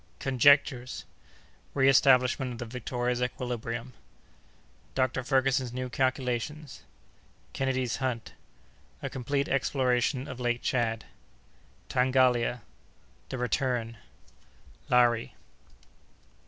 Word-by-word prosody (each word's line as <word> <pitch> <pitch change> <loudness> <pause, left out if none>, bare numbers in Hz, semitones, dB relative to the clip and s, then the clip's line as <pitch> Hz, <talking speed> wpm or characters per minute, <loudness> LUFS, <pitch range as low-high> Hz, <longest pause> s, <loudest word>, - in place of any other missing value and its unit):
Conjectures.—Reestablishment 130 - +2
of 115 - -10
the - - -13
Victoria's 125 0 -2
Equilibrium.—Dr. 125 +1 -5
Ferguson's 130 -1 +1
New 130 0 -4
Calculations.—Kennedy's 130 0 -3
Hunt.—A 130 -4 -7
Complete 140 +2 -1
Exploration 130 0 0
of 130 - -7
Lake 120 -1 -1
Tchad.—Tangalia.—The 120 - -2
Return.—Lari. 120 -1 -2
125 Hz, 55 wpm, -28 LUFS, 120-130 Hz, -, Conjectures.—Reestablishment